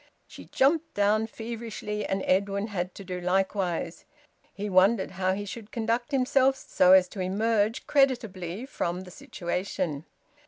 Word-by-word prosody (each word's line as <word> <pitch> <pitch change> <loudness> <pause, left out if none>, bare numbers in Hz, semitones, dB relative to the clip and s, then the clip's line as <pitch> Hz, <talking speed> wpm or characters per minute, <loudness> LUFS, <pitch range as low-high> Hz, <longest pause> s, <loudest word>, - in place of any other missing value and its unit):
She - - -12
jumped 315 +4 +1
down 210 +2 +2
feverishly, 225 -2 -5
and 195 0 -1
Edwin 200 +3 +1
had 180 -2 -3
to 195 - -9
do 180 -1 -5
likewise. 180 -2 -1 0.5
He 205 +1 -5
wondered 190 +2 +3
how 190 0 0
he 205 +2 -4
should 210 +1 -8
conduct 230 +1 -1
himself 265 0 +3
so 185 -7 +3
as 185 -1 +6
to 200 - -9
emerge 210 +4 0
creditably 225 - 0
from 180 -9 -3
the 185 -1 -11
situation. 175 -4 -4
200 Hz, 145 wpm, -27 LUFS, 185-230 Hz, 0.5 s, as